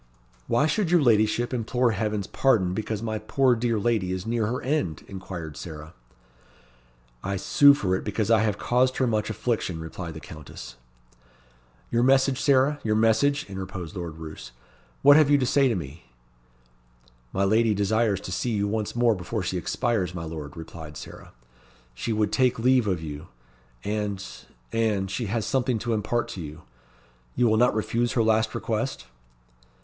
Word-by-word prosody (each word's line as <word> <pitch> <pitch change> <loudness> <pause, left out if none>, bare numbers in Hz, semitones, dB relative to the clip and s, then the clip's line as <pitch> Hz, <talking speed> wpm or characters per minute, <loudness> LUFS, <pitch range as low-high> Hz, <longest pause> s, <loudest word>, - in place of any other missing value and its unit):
"Why 120 +5 +3
should 160 +4 0
your 175 0 +5
ladyship 115 +1 +2
implore 125 +1 +1
Heaven's 105 -1 -2
pardon 100 -9 +2
because 110 +1 -3
my 110 -1 -2
poor 130 +4 +2
dear 115 -1 0
lady 105 -4 0
is 95 0 -3
near 115 -1 0
her 125 +3 -2
end?" 130 - -1
inquired 90 -5 -7
Sarah. 80 -2 -8 1.3
"I 100 +1 -2
sue 140 +8 +6
for 95 -9 0
it - - -3
because 105 +1 -1
I 110 - +6
have 105 -1 0
caused 125 +3 +1
her 130 - +2
much 110 -3 0
affliction," 110 -6 -2
replied 80 0 -7
the - - -6
Countess. 75 -5 -10 1.2
"Your 120 - +2
message, 135 +1 +3
Sarah 140 +1 +3
your 110 -1 +1
message?" 140 +7 +2
interposed 95 -4 -7
Lord 85 -3 -6
Roos. 80 -6 -9 0.5
"What 145 +1 +8
have 155 -2 +5
you 145 - +6
to 130 - +1
say 135 +2 +3
to 120 - +1
me?" 80 -3 -7 1.3
"My 95 - 0
lady 110 +2 +3
desires 105 0 +1
to - - -7
see 120 - -1
you 100 -1 0
once 105 +1 -2
more 120 -1 +4
before 95 +2 -4
she 90 - -2
expires, 95 -3 -1
my 85 - -4
lord," 80 -2 -7
replied 80 -2 -9
Sarah. - - -11 0.6
"She 65 - -4
would 105 -2 +1
take 130 -1 +2
leave 125 0 +3
of 90 -5 -1
you; 75 +2 -7 0.6
and 105 -2 -2 0.5
and 105 -4 0
she 115 +2 -2
has 110 +1 -1
something 130 -3 0
to 115 +1 -2
impart 110 +2 -1
to 90 - -6
you. 75 +1 -9 0.7
You 125 - +2
will 110 -1 +3
not 120 -1 +3
refuse 115 +2 0
her 115 - +2
last 110 0 +2
request?" 115 - -2
110 Hz, 170 wpm, -25 LUFS, 95-120 Hz, 1.3 s, What